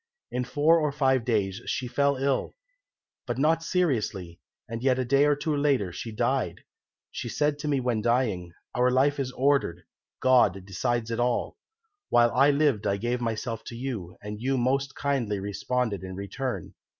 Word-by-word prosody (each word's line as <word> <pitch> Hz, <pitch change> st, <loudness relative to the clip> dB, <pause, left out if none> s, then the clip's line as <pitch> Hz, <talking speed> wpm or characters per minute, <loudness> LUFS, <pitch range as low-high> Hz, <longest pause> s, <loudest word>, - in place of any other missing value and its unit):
"In 125 Hz, 0 st, -1 dB
four 150 Hz, +6 st, +3 dB
or 150 Hz, -2 st, 0 dB
five 135 Hz, -3 st, +2 dB
days 105 Hz, -5 st, 0 dB
she 125 Hz, -, -2 dB
fell 140 Hz, +3 st, +2 dB
ill, 135 Hz, 0 st, -1 dB, 0.7 s
but -, -, -2 dB
not 160 Hz, +4 st, +3 dB
seriously, 115 Hz, -, -1 dB, 0.3 s
and 115 Hz, +1 st, -5 dB
yet 130 Hz, -1 st, +3 dB
a 130 Hz, -, 0 dB
day 140 Hz, +3 st, +4 dB
or 145 Hz, 0 st, +4 dB
two 150 Hz, +1 st, -1 dB
later 140 Hz, -10 st, +1 dB
she 115 Hz, +6 st, -6 dB
died. 105 Hz, -, -1 dB, 0.5 s
She 120 Hz, -, -5 dB
said 145 Hz, +3 st, 0 dB
to 150 Hz, -, -4 dB
me 140 Hz, -2 st, +2 dB
when 120 Hz, -4 st, 0 dB
dying, 110 Hz, -7 st, 0 dB, 0.2 s
'Our 125 Hz, +1 st, +3 dB
life 140 Hz, +3 st, +2 dB
is 130 Hz, -2 st, -2 dB
ordered, 135 Hz, -, +1 dB, 0.4 s
God 105 Hz, -8 st, +3 dB
decides 115 Hz, +4 st, -1 dB
it 115 Hz, -, -2 dB
all. 120 Hz, -, 0 dB, 0.5 s
While 120 Hz, 0 st, +5 dB
I 135 Hz, +3 st, +5 dB
lived 140 Hz, -8 st, +2 dB
I 100 Hz, -, +1 dB
gave 120 Hz, +4 st, -2 dB
myself 115 Hz, 0 st, -3 dB
to 115 Hz, -, -7 dB
you, 115 Hz, -8 st, -5 dB
and 105 Hz, +1 st, -6 dB
you 135 Hz, +2 st, +1 dB
most 135 Hz, +2 st, 0 dB
kindly 125 Hz, -8 st, -1 dB
responded 100 Hz, +2 st, -2 dB
in 95 Hz, 0 st, -6 dB
return. 100 Hz, +1 st, -4 dB
125 Hz, 175 wpm, -27 LUFS, 110-140 Hz, 0.7 s, While